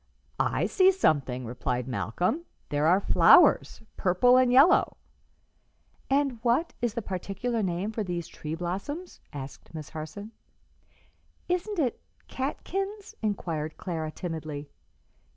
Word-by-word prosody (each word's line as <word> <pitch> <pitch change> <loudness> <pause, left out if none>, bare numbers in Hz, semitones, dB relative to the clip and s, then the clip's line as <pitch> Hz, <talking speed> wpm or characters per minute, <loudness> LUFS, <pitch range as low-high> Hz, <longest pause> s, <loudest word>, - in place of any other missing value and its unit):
"I - - +1
see 380 -1 +5
something," 135 - +1
replied 125 +1 -3
Malcolm: 175 - -1 0.2
"there 145 +1 +1
are 180 +3 +5
flowers 210 - +5
purple 195 +7 +4
and 255 -1 +4
yellow." 280 +9 +5 1.1
"And 275 -3 +1
what 250 +8 +1
is 240 -3 -1
the 235 - -3
particular 200 +5 -3
name 185 +2 -1
for 220 -1 -2
these 175 -3 -4
tree 155 +1 -6
blossoms?" 195 - -5
asked 135 +3 -9
Miss 155 -2 -7
Harson. 170 +7 -7 1.2
"Isn't 365 +4 -1
it 270 -7 0 0.3
catkins?" 390 +9 -4
inquired 165 -8 -3
Clara, 160 -4 -4
timidly. 155 -4 -6
195 Hz, 115 wpm, -28 LUFS, 155-260 Hz, 1.2 s, see